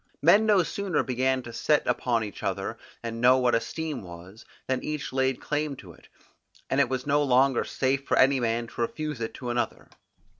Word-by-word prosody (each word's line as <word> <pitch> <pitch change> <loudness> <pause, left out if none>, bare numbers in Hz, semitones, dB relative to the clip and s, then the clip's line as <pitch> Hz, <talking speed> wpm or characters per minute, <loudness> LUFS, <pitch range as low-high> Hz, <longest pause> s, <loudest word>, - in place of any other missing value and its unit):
Men 200 +8 +5
no 200 -4 +5
sooner 190 +1 -1
began 130 +1 0
to 120 - -9
set 150 +5 +2
a - - +3
value - - -17
upon 115 -3 0
each 105 -4 -7
other, - - -2 0.3
and 115 0 -5
know 125 +1 +6
what 125 -2 +2
esteem 145 +5 -2
was, 90 +4 -12 0.2
than 130 -1 -1
each 150 -3 -4
laid 130 -1 +1
claim 150 -1 -2
to 90 -9 -12
it, - - -20 0.6
and - - +2
it - - +3
was 130 -1 -2
no 145 +1 +2
longer 135 -1 +3
safe 135 +1 -1
for - - +2
any 135 +1 +5
man 115 0 0
to 115 - -7
refuse 150 +2 -3
it 115 - -4
to 125 -1 -4
another. 120 0 -3
130 Hz, 210 wpm, -27 LUFS, 120-145 Hz, 0.6 s, know